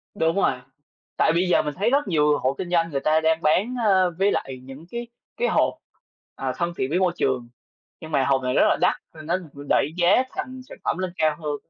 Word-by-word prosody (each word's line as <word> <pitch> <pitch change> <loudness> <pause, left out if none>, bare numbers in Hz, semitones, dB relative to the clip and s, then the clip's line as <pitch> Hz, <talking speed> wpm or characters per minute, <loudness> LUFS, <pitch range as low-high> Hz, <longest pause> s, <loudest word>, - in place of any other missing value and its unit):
Đúng 165 -4 +1
rồi. 195 -8 +2 0.6
Tại 160 - +3
bây 175 +2 +1
giờ - - +4
mình 150 - -4
thấy 200 +7 0
rất 280 +3 +1
nhiều 150 -4 +3
hộ 130 - 0
kinh 180 - -5
doanh 170 -1 +2
người 140 - -1
ta 155 +3 +2
đang 160 +1 +2
bán, 190 +11 +2
ơ, 185 -3 +4
với 200 +1 +3
lại 130 -1 -3
những 135 +4 -11
cái 235 0 -5 0.3
cái - - +1
hộp, - - +2 0.6
ờ, - - -2
thân 170 0 -1
thiện 130 - -1
với 175 +5 +1
môi 180 -2 +2
trường, 125 -6 -1 0.5
nhưng 160 -1 -9
mà 135 -3 +2
hộp 135 -1 +2
này 125 0 0
rất - - +4
là - - +2
đắt - - +3 0.2
nên 155 -1 -10
nó 170 +3 +1 0.3
đẩy 145 - +2
giá 185 +8 +4
thành 255 0 -6
sản - - -10
phẩm - - -1
lên 185 -1 -3
cao 155 -1 +2
hơn. 150 -1 -2
165 Hz, 235 wpm, -24 LUFS, 150-185 Hz, 0.6 s, giờ